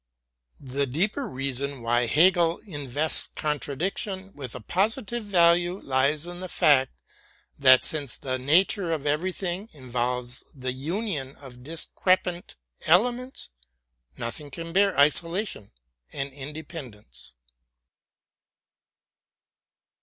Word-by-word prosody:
The 140 +1 -2
deeper 195 - -1
reason 135 0 -2
why 120 +1 +2
Hegel 170 +4 +4
in 145 -8 -6
vests 150 +6 +1
contradiction 185 +6 -2
with 130 -5 -7
a - - -5
positive 215 - -1
value 175 -2 +3
lies 140 +4 +1
in 175 0 -7
the 185 0 -6
fact 135 -5 +3 0.6
that, 130 -2 +7
since 145 -4 0
the 130 -1 -3
nature 170 +6 +3
of 150 -3 -3
everything 180 +6 -2
involves 125 -2 -2
the 130 -2 -2
union 150 - -3
of 125 -3 -13
dis 155 +5 -3
crepant 185 -1 0 0.3
elements, 245 - +2 0.7
nothing 130 +5 -5
can 165 +4 -6
bear 195 -2 +3
isolation 165 - +1 0.4
and 135 0 -4
inde 145 +3 -8
pendence. 105 - -10
150 Hz, 110 wpm, -26 LUFS, 130-180 Hz, 0.7 s, that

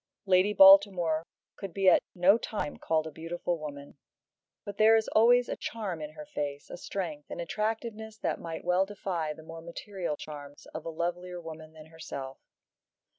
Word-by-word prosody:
Lady 190 +1 +4
Baltimore 190 -5 +6 0.3
could 195 -4 -7
be 195 -1 +1
at - - +7
no 185 +3 +6
time 205 -12 -4
called 160 -1 0
a 160 - -6
beautiful 170 +2 -3
woman. 145 -2 -9 0.7
But 200 -1 -8
there 220 +1 +7
is 220 -1 +2
always 240 +2 +5
a - - -3
charm 200 -8 -5
in 150 0 -6
her 150 -1 -9
face, 145 -1 -5
a - - -6
strength, 170 -6 -5
an - - -6
attractiveness 220 +4 -3
that - - -2
might 165 -1 -6
well 180 +2 +2
defy 180 -6 -3
the 160 - -13
more 165 +1 -9
material 170 -1 -5
charms 145 -2 -10
of 155 - -6
a - - -2
lovelier 175 +2 -3
woman 160 -1 -10
than 155 -1 -13
herself. 140 -4 -8
170 Hz, 175 wpm, -29 LUFS, 155-200 Hz, 0.7 s, at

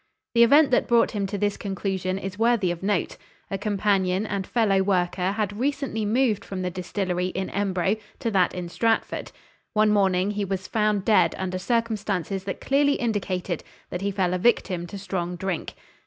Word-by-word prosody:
The 235 - +4
event 280 +4 +6
that 245 - +3
brought 235 -1 +4
him 200 -3 -2
to 200 +1 -3
this 205 0 0
conclusion 190 -1 -2
is 195 0 -6
worthy 225 -6 +3
of 175 - -5
note. 195 -2 -1 0.3
A 195 - -1
companion 195 -1 +1
and 200 -3 -3
fellow 205 -5 +2
worker 185 0 +1
had 205 -1 -2
recently 275 -5 -1
moved 225 -1 +1
from 185 -1 -5
the 180 - -2
distillery 180 0 -2
in 190 +1 -4
Embro 195 0 0 0.2
to 235 -4 -2
that 185 -3 +2
in 180 -1 -4
Stratford. 225 +6 -1 0.4
One 215 0 +4
morning 195 -1 +2
he 210 0 -2
was 190 -1 -3
found 210 -2 0
dead 185 -6 +4
under 185 -1 -3
circumstances 205 -4 -1
that 195 - -4
clearly 285 +1 +3
indicated 190 - -2 0.3
that 180 - -3
he 200 - 0
fell 190 -2 0
a 180 - 0
victim 180 -5 +1
to 200 - -7
strong 180 -2 -3
drink. 185 -1 -4
195 Hz, 180 wpm, -25 LUFS, 185-215 Hz, 0.4 s, event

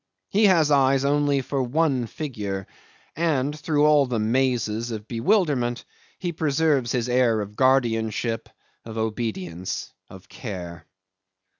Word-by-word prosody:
He 210 +2 +3
has 165 -6 +4
eyes 135 -1 +3
only 145 -1 +2
for 135 +1 -2
one 130 -1 +1
figure, 105 -9 -5 0.5
and 150 -3 0
through 150 -1 +2
all 150 -2 +5
the 125 -2 -1
mazes 115 -1 0
of 110 -2 -6
bewilderment 125 - +1 0.3
he 175 -2 -3
preserves 150 -5 +1
his 120 -1 0
air 120 -3 +2
of 105 0 -6
guardianship, 115 -3 +1 0.3
of 115 0 -8
obedience, 105 -6 -3 0.2
of 95 -1 -13
care. 90 -7 -8
125 Hz, 125 wpm, -24 LUFS, 110-145 Hz, 0.5 s, all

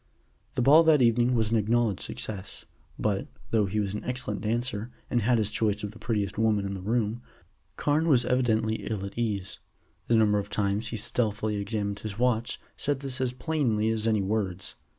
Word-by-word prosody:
The 125 - +1
ball 145 +5 +8
that 150 -5 +5
evening 120 +1 +3
was 110 -2 +1
an 115 - +3
acknowledged 110 -1 +1
success, 100 -2 -5 0.3
but, - - -1 0.2
though 110 -3 +3
he 105 +3 -1
was 100 -2 -1
an 105 - -4
excellent 125 -5 -3
dancer, 115 0 -1 0.2
and 120 - +2
had 120 +3 +3
his 110 -1 0
choice 105 -1 0
of 105 - -3
the 115 - -14
prettiest 105 -4 -2
women 110 -3 +2
in 100 - -3
the 95 - -6
room, 110 +2 -1 0.5
Carne 150 +6 +1
was 125 -6 +4
evidently 110 -3 +1
ill 105 -3 -3
at 100 - -8
ease. 105 -5 -2 0.5
The 115 - +3
number 105 -2 +4
of 100 0 -5
times 105 +1 0
he 115 - -3
stealthily 110 -2 0
examined 100 0 -2
his 105 -1 -6
watch 120 -1 +1 0.2
said 140 -1 -1
this 135 -2 -1
as 130 -1 +1
plainly 125 -6 0
as 110 0 0
any 110 -3 +2
words. 95 -2 -2
110 Hz, 190 wpm, -27 LUFS, 105-120 Hz, 0.5 s, ball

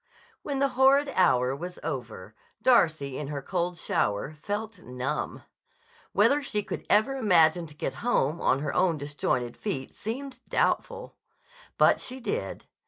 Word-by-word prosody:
When 285 -2 -3
the 275 0 +2
horrid 270 +3 +4
hour 130 - +3
was 175 +5 -7
over, 115 - -5 0.3
Darcy 160 - +3
in 150 - -4
her 140 -1 -5
cold 180 0 -2
shower 105 -3 -1
felt 210 +1 -4
numb. 130 0 -4 0.7
Whether 290 +1 +4
she 210 -7 -2
could - - -6
ever 265 +6 +3
manage 170 -4 +4
to 150 - -15
get - - -3
home 170 - +1
on 135 - +2
her 150 - -2
own 180 -3 +2
disjointed 135 -4 -2
feet 140 -11 -4
seemed 260 +5 -6
doubtful. 485 +1 -1 0.6
But - - +5
she 255 +1 -6
did. 435 - -4
175 Hz, 145 wpm, -27 LUFS, -, 0.7 s, But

